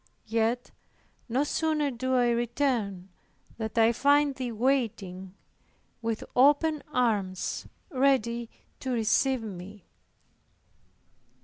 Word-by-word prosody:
Yet 230 Hz, +2 st, 0 dB, 0.6 s
no 255 Hz, +5 st, +2 dB
sooner 305 Hz, -1 st, 0 dB
do 260 Hz, +1 st, -1 dB
I 245 Hz, -1 st, +3 dB
return, 235 Hz, -6 st, -1 dB, 0.5 s
than 220 Hz, -1 st, -2 dB
I 225 Hz, 0 st, +5 dB
find 285 Hz, +3 st, +3 dB
Thee 255 Hz, -2 st, -4 dB
waiting, 210 Hz, -7 st, -1 dB, 0.7 s
with 225 Hz, -1 st, -2 dB
open 295 Hz, +3 st, +4 dB
arms 210 Hz, -8 st, -1 dB, 0.2 s
ready 245 Hz, -4 st, +1 dB, 0.3 s
to 260 Hz, -, -5 dB
receive 245 Hz, +2 st, +2 dB
me." 200 Hz, -1 st, -9 dB
240 Hz, 95 wpm, -28 LUFS, 220-270 Hz, 0.7 s, I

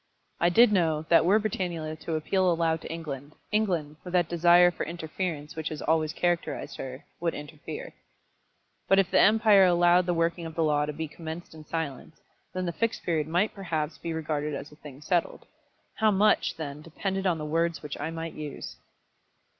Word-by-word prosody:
I 175 Hz, -, +4 dB
did 230 Hz, +6 st, +6 dB
know 160 Hz, -6 st, +2 dB
that 165 Hz, -1 st, +6 dB
were 200 Hz, +5 st, +5 dB
Britannula 175 Hz, -7 st, -3 dB
to 165 Hz, -, -3 dB
appeal 185 Hz, +4 st, +1 dB
aloud 165 Hz, -1 st, +1 dB
to -, -, -7 dB
England, 150 Hz, -3 st, -6 dB, 0.2 s
England, 175 Hz, -9 st, 0 dB
with 180 Hz, -, -8 dB
that 175 Hz, -3 st, +3 dB
desire 175 Hz, +1 st, +6 dB
for -, -, -4 dB
interference 160 Hz, -2 st, -4 dB
which 160 Hz, 0 st, -3 dB
has 155 Hz, -, -6 dB
always 155 Hz, -1 st, +1 dB
characterised 175 Hz, +1 st, -2 dB
her, 130 Hz, 0 st, -7 dB
would 170 Hz, -1 st, -1 dB
interfere. 155 Hz, -, -8 dB, 0.9 s
But 195 Hz, -, +5 dB
if 195 Hz, -1 st, +3 dB
the -, -, +4 dB
empire 215 Hz, -2 st, +6 dB
allowed 175 Hz, 0 st, +4 dB
the 175 Hz, -, +1 dB
working 165 Hz, 0 st, 0 dB
of 160 Hz, -, -10 dB
the 165 Hz, -, +1 dB
law 150 Hz, -1 st, +2 dB
to -, -, -2 dB
be 160 Hz, +2 st, -4 dB
commenced 160 Hz, +2 st, -8 dB
in 155 Hz, -1 st, -12 dB
silence, 160 Hz, -2 st, -5 dB, 0.3 s
then 185 Hz, 0 st, -3 dB
the 170 Hz, -, -2 dB
Fixed 230 Hz, +4 st, -1 dB
Period 155 Hz, -3 st, 0 dB
might 175 Hz, +6 st, +1 dB
perhaps 155 Hz, -6 st, -3 dB
be 170 Hz, -, -4 dB
regarded 150 Hz, -2 st, -2 dB
as 145 Hz, +2 st, -7 dB
a -, -, -14 dB
thing 145 Hz, -2 st, -12 dB
settled. 175 Hz, +1 st, -1 dB, 0.5 s
How 220 Hz, 0 st, +4 dB
much, 210 Hz, +1 st, +3 dB
then, 150 Hz, -2 st, -6 dB
depended 190 Hz, +4 st, -3 dB
on 175 Hz, -3 st, +2 dB
the 155 Hz, -, -5 dB
words 165 Hz, 0 st, 0 dB
which 150 Hz, -2 st, -6 dB
I 150 Hz, -, -2 dB
might 165 Hz, 0 st, -5 dB
use! 150 Hz, -2 st, -7 dB
165 Hz, 190 wpm, -27 LUFS, 155-180 Hz, 0.9 s, did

